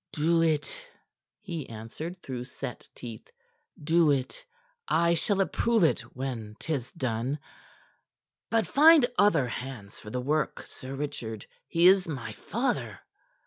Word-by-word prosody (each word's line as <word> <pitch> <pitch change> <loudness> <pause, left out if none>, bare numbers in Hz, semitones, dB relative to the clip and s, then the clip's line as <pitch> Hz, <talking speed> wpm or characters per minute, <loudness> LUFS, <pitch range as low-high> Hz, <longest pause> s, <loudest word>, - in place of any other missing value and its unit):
"Do 165 +2 +3
it," 165 - 0 0.6
he 170 -9 -5
answered 120 +11 -7
through 125 -2 -5
set 130 0 -7
teeth. 115 -3 -9 0.5
"Do 160 +1 +4
it! 135 -2 0 0.4
I 170 +1 +3
shall 195 +4 +1
approve 225 +2 +2
it 160 - +4 0.2
when 120 -5 -4
'tis 140 -7 -3
done. 130 -3 -1 1.1
But 225 -1 +2
find 310 -1 +7
other 165 -11 +4
hands 120 -5 -7
for 105 - -10
the 125 - -2
work, 150 +3 -1
Sir 130 +1 -8
Richard. 115 -7 -4 0.2
He 170 +1 +2
is 190 0 +7
my 130 -8 -4
father." 240 - -2
150 Hz, 130 wpm, -28 LUFS, 125-175 Hz, 1.1 s, find